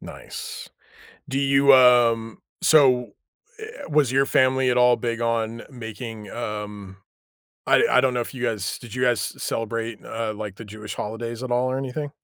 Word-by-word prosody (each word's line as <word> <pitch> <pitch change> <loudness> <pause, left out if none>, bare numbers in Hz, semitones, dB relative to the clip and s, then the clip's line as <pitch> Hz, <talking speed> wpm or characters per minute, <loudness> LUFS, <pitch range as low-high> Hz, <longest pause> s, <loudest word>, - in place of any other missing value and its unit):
Nice. - - -8 0.6
Do 135 - -1
you, 140 0 +5
um 120 -3 +4 0.2
so, 130 -5 +4 0.5
eh, - - -8 0.3
was 145 -4 +2
your 135 +1 +3
family 130 -1 +3
at 125 - +1
all 125 0 +5
big 115 -1 -3
on 115 0 -1
making, 115 -4 -8
um, 105 -4 -6 0.7
I - - +5
I 125 - +5
don't 130 -1 +2
know 120 - 0
if 120 - -5
you 125 - -7
guys 105 -6 -2
did 120 -2 -11
you 125 - -3
guys 120 -2 +2 0.2
celebrate, 115 0 -3
uh, 115 -1 -4
like, 105 -2 -7
the 115 - -9
Jewish 105 +1 -8
holidays 115 +3 -5
at 130 - -5
all 125 +1 +1
or 130 - -1
anything? 135 +2 -4
120 Hz, 170 wpm, -23 LUFS, 110-130 Hz, 0.7 s, you